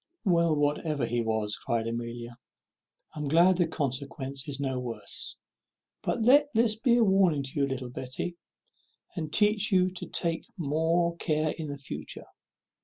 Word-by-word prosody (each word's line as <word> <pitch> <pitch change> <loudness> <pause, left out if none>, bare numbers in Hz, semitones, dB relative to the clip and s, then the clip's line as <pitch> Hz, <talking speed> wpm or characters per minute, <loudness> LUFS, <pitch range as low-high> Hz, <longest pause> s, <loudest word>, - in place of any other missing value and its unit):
"Well, 170 -4 +3
whatever 145 0 0
he 120 0 0
was," 110 -2 -1
cries 115 -3 -1
Amelia, 115 0 -4 0.8
"I - - -7
am 150 - -2
glad 170 +5 +5
the 175 -2 +2
consequence 140 -1 -2
is 140 -1 -2
no 135 -2 -1
worse; 115 -5 -4 0.6
but 225 - -1
let 285 +5 +6
this 225 -1 +4
be 235 +2 +2
a 235 - +5
warning 190 -8 +3
to 135 +2 -4
you, 140 - +3
little 130 -2 -4
Betty, 130 +8 -4 0.8
and 160 -4 -4
teach 210 +2 +3
you 185 -1 +4
to 185 - -6
take 165 -2 -1
more 165 +2 +1
care 155 -2 0
for 160 -2 -5
the 145 -1 -5
future. 80 - -7
150 Hz, 160 wpm, -28 LUFS, 130-180 Hz, 0.8 s, let